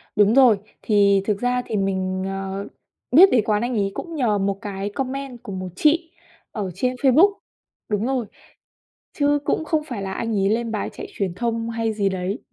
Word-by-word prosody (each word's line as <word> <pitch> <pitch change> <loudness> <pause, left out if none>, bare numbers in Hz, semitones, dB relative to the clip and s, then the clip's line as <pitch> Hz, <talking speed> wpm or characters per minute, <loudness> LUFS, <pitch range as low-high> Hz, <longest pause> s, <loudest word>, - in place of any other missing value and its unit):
Đúng 210 +1 +4
rồi, 255 -6 +6 0.2
thì 200 -2 +3
thực 205 -1 0
ra 245 +1 0
thì 215 - -2
mình, 190 -1 -1
ờ, 195 +1 -4 0.4
biết 360 +9 +8
đến 235 -4 +4
quán 210 -1 +1
anh 240 +1 -1
ấy 200 -2 0
cũng 335 -2 -6
nhờ 235 -8 +1
một 195 0 -1
cái 200 -1 -4
comment 265 +1 -5
của - - -7
một 185 -1 -4
chị 325 - +2 0.4
ở 200 -4 -4
trên 255 0 -1
Facebook. 285 +10 +5 0.6
Đúng 210 +1 0
rồi, 260 -2 -1 0.9
chứ 290 0 +2
cũng 315 - 0
không 315 -1 0
phải 245 -9 -6
là 190 -1 -4
anh 225 +1 -2
ấy 195 0 +2
lên 230 +1 0
bài 215 - -2
chạy - - -7
truyền 190 -4 -2
thông 230 0 -2
hay 225 -1 -1
gì 200 -2 +1
đấy. 190 +3 -3
220 Hz, 195 wpm, -22 LUFS, 195-255 Hz, 0.9 s, biết